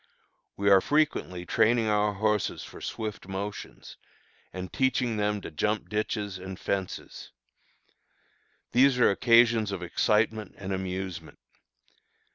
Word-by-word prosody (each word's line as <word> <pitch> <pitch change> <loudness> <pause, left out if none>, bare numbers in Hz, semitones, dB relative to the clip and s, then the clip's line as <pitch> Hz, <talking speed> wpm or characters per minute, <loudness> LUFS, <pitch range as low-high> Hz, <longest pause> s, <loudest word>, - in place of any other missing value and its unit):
We 100 0 +2
are 95 -1 +7
frequently 145 - 0
training 115 +5 +2
our 105 0 +2
horses 105 0 0
for - - -11
swift 105 -4 -5
motions, 100 +1 -7 0.5
and 95 -1 -7
teaching 125 -3 +1
them 105 0 0
to - - -8
jump 105 +7 -1
ditches 105 -2 -2
and 95 0 -8
fences. 95 -2 -4 1.4
These 130 +2 +4
are 120 - +5
occasions 115 0 +4
of 95 -2 -4
excitement 105 +3 0
and 95 0 -4
amusement. 95 -3 -5
105 Hz, 115 wpm, -28 LUFS, 95-110 Hz, 1.4 s, are